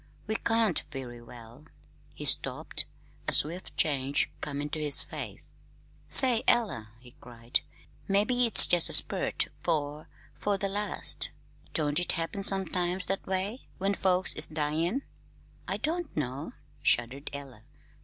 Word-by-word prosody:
We 220 Hz, -, -3 dB
can't 225 Hz, -5 st, 0 dB
very 125 Hz, -4 st, -9 dB
well 120 Hz, +3 st, -15 dB, 0.2 s
" -, -, -31 dB
He -, -, -8 dB
stopped, -, -, +1 dB, 0.4 s
a -, -, +1 dB
swift 170 Hz, +5 st, +4 dB
change 140 Hz, -2 st, 0 dB
coming 145 Hz, 0 st, -4 dB
to 155 Hz, -, -4 dB
his 145 Hz, -2 st, +4 dB
face. -, -, -6 dB, 0.6 s
"Say, 250 Hz, -4 st, +4 dB
Ella," 160 Hz, -, 0 dB
he 125 Hz, 0 st, -17 dB
cried, 120 Hz, +2 st, -4 dB, 0.5 s
"mebbe 200 Hz, +4 st, +1 dB
it's 245 Hz, -3 st, +8 dB
jest 175 Hz, -2 st, +1 dB
a -, -, -1 dB
spurt -, -, +2 dB
'fore 150 Hz, -2 st, -3 dB, 0.3 s
'fore 205 Hz, -1 st, -2 dB
the 195 Hz, 0 st, -3 dB
last. 205 Hz, +1 st, 0 dB, 0.5 s
Don't 150 Hz, -1 st, +1 dB
it 180 Hz, -, -1 dB
happen 170 Hz, +3 st, -3 dB
sometimes 185 Hz, -2 st, +3 dB
that 195 Hz, +1 st, -3 dB
way 195 Hz, +6 st, -3 dB
when 195 Hz, +1 st, -1 dB
folks 185 Hz, -2 st, +4 dB
is 155 Hz, -, +2 dB
dyin'?" 160 Hz, -, -2 dB, 0.6 s
"I -, -, -3 dB
don't 335 Hz, -, -4 dB
know," 135 Hz, -1 st, -5 dB, 0.3 s
shuddered 125 Hz, +5 st, 0 dB
Ella. 135 Hz, -6 st, -10 dB
165 Hz, 140 wpm, -27 LUFS, 140-195 Hz, 0.6 s, it's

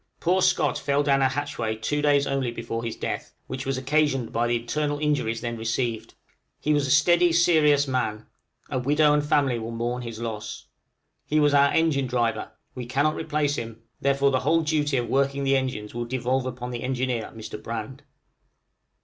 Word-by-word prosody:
Poor 185 Hz, +2 st, +2 dB
Scott -, -, +2 dB
fell 140 Hz, 0 st, +1 dB
down 140 Hz, -1 st, +3 dB
a 135 Hz, -, +4 dB
hatchway 135 Hz, -5 st, -3 dB
two 145 Hz, +7 st, -2 dB
days 145 Hz, -1 st, +3 dB
only 135 Hz, -2 st, -1 dB
before 115 Hz, 0 st, -5 dB
his 115 Hz, -1 st, -4 dB
death, -, -, -5 dB
which 130 Hz, 0 st, -6 dB
was 135 Hz, -1 st, 0 dB
occasioned 135 Hz, -2 st, 0 dB
by 120 Hz, +1 st, +1 dB
the 120 Hz, -, +1 dB
internal 145 Hz, +5 st, -1 dB
injuries 145 Hz, -7 st, 0 dB
then 120 Hz, -1 st, -3 dB
received; 115 Hz, 0 st, -3 dB, 0.4 s
he 150 Hz, -, +1 dB
was 145 Hz, -2 st, +1 dB
a -, -, -4 dB
steady, 175 Hz, +5 st, +4 dB
serious 155 Hz, -4 st, +4 dB
man; 110 Hz, -5 st, -2 dB, 0.5 s
a 130 Hz, -, 0 dB
widow 150 Hz, +3 st, +3 dB
and 150 Hz, 0 st, +2 dB
family 140 Hz, -5 st, +2 dB
will 115 Hz, 0 st, -5 dB
mourn 120 Hz, +2 st, -3 dB
his 115 Hz, -2 st, -7 dB
loss. 110 Hz, -2 st, -5 dB, 0.6 s
He 155 Hz, -, +2 dB
was 145 Hz, -1 st, +3 dB
our 140 Hz, 0 st, +5 dB
engine 150 Hz, -5 st, +2 dB
driver; 120 Hz, -2 st, -1 dB, 0.2 s
we 125 Hz, -2 st, -6 dB
cannot 145 Hz, +5 st, +1 dB
replace 150 Hz, -2 st, -1 dB
him, 115 Hz, 0 st, -7 dB, 0.2 s
therefore 140 Hz, 0 st, +2 dB
the 130 Hz, -, +2 dB
whole 160 Hz, +6 st, +2 dB
duty 150 Hz, -3 st, 0 dB
of 120 Hz, -1 st, -1 dB
working 140 Hz, +1 st, +1 dB
the 135 Hz, 0 st, +3 dB
engines 130 Hz, -6 st, -2 dB
will 120 Hz, 0 st, -3 dB
devolve 130 Hz, +1 st, -1 dB
upon 125 Hz, -1 st, -5 dB
the 120 Hz, -1 st, -5 dB
engineer, 125 Hz, -3 st, -2 dB
Mr. 110 Hz, -1 st, -8 dB
Brand. 115 Hz, +4 st, -6 dB
135 Hz, 185 wpm, -25 LUFS, 120-145 Hz, 0.6 s, our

